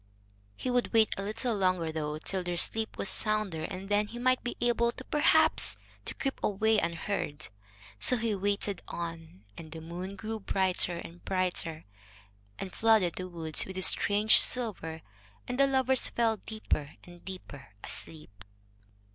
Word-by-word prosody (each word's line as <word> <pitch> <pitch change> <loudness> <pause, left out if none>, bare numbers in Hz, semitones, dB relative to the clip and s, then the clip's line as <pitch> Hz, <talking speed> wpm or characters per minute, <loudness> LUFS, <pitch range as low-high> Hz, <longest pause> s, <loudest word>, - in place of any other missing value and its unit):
He 255 - -2
would 245 0 0
wait 220 -2 +4
a - - -4
little 220 +4 -2
longer, 185 -4 +1
though, 150 -1 -3
till 185 +4 -3
their 175 -1 -3
sleep 220 +5 +1
was - - +2
sounder, 210 -8 +3
and 190 +3 -6
then 205 +1 +1
he 235 - -9
might 255 +1 +1
be 240 - -4
able 235 -1 +2
perhaps 295 +5 +3 0.3
to - - -6
creep 270 -1 -3
away 215 +2 +2
unheard. 170 -3 -3 0.5
So 250 - +6
he 230 -1 -1
waited 200 -1 -1
on, 165 - -7
and 160 -1 -10
the 165 - -7
moon 175 +4 -7
grew 220 +1 -5
brighter 185 -3 +1
and 170 +1 -10
brighter, 180 -4 -2 0.7
and 185 - -6
flooded 220 -6 +3
the 185 - -4
woods 160 -3 -1
with 190 0 -7
its 185 - +2
strange 210 +1 +5
silver. 185 -10 -2 0.4
And 250 - -4
the 275 - +6
lovers 265 -1 +2
fell 225 -2 +1
deeper 195 -10 -4
and 175 -1 -15
deeper 165 -9 -9 0.2
asleep. 100 -12 -6
195 Hz, 155 wpm, -30 LUFS, 170-220 Hz, 0.7 s, So